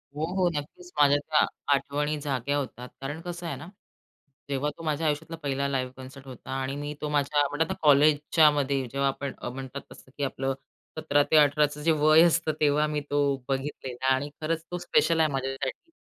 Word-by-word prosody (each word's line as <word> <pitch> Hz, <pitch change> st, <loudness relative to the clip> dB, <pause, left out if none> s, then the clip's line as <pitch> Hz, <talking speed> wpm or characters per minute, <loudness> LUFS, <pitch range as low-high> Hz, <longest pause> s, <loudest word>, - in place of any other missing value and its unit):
हो, 155 Hz, +2 st, -1 dB
हो. 180 Hz, -2 st, +3 dB
नक्कीच. 175 Hz, +5 st, -7 dB
माझ्या 145 Hz, 0 st, +6 dB
त्या 150 Hz, +1 st, +2 dB, 0.3 s
आठवणी 145 Hz, +2 st, -1 dB
जाग्या 140 Hz, 0 st, -1 dB
होतात, 125 Hz, -2 st, -5 dB
कारण 145 Hz, +4 st, -4 dB
कसं 175 Hz, 0 st, -6 dB
आहे 165 Hz, -, -3 dB
ना, 145 Hz, +5 st, -10 dB, 0.8 s
जेव्हा 140 Hz, +1 st, 0 dB
तो 165 Hz, -, -10 dB
माझ्या 155 Hz, 0 st, -1 dB
आयुष्यातला 160 Hz, +3 st, -2 dB
पहिला 140 Hz, 0 st, -1 dB
लाईव्ह 130 Hz, -2 st, -2 dB
कॉन्सर्ट 130 Hz, +1 st, -11 dB
होता. 130 Hz, 0 st, -10 dB
आणि 135 Hz, +1 st, -3 dB
मी 145 Hz, +1 st, -4 dB
तो 150 Hz, -, -2 dB
माझ्या 145 Hz, 0 st, +2 dB
म्हणतात 160 Hz, +3 st, 0 dB
ना -, -, -2 dB
कॉलेजच्यामध्ये 145 Hz, -1 st, +4 dB
जेव्हा 140 Hz, 0 st, 0 dB
आपण 135 Hz, 0 st, -3 dB
अ, -, -, -3 dB
म्हणतात 135 Hz, +2 st, -7 dB
तसं 130 Hz, -, -15 dB
की 145 Hz, -, -2 dB
आपलं 135 Hz, 0 st, -1 dB, 0.4 s
17 145 Hz, -2 st, +2 dB
ते 160 Hz, -, +6 dB
18चं 150 Hz, 0 st, +3 dB
जे 165 Hz, -, +4 dB
वय 155 Hz, +1 st, +5 dB
असतं, 170 Hz, -2 st, +3 dB
तेव्हा 150 Hz, 0 st, +3 dB
मी 150 Hz, -1 st, -2 dB
तो 145 Hz, 0 st, +1 dB, 0.3 s
बघितलेला 135 Hz, -2 st, -4 dB
आणि 135 Hz, +2 st, -2 dB
खरंच 165 Hz, +1 st, -1 dB
तो 180 Hz, -, -2 dB
स्पेशल 170 Hz, -1 st, +2 dB
आहे 155 Hz, -, +4 dB
माझ्यासाठी 135 Hz, -, -4 dB
145 Hz, 185 wpm, -27 LUFS, 135-155 Hz, 0.8 s, माझ्या